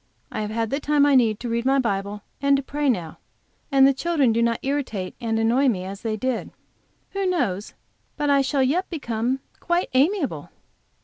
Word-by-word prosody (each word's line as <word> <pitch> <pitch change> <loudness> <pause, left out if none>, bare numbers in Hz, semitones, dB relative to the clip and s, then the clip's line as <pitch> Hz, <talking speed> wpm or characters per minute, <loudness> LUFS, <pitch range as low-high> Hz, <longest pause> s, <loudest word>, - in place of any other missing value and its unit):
I - - -3
have 215 +1 -4
all 230 - +2
the 275 +6 -2
time 295 -1 +3
I 290 - +4
need 230 -5 +3
to 245 - -4
read 235 0 -1
my 270 +2 +3
Bible 205 -4 -2 0.2
and 280 0 +4
to 275 - -3
pray 290 +1 -1
now, 175 -10 -2 0.5
and 270 -1 +6
the 275 - +5
children 285 -5 +1
do 230 - +1
not 230 -1 +2
irritate 260 -9 -2
and 225 -1 -1
annoy 235 +5 +3
me 195 -8 +1
as 195 +1 -7
they 220 -2 -2
did. 255 +1 -2 0.6
Who 395 -1 -1
knows 215 - -1 0.4
but 295 -1 0
I 280 -1 +4
shall 270 0 +1
yet 330 +9 0
become 255 -4 -2 0.2
quite 345 +1 0
amiable? 275 - +1
255 Hz, 195 wpm, -23 LUFS, 225-285 Hz, 0.6 s, and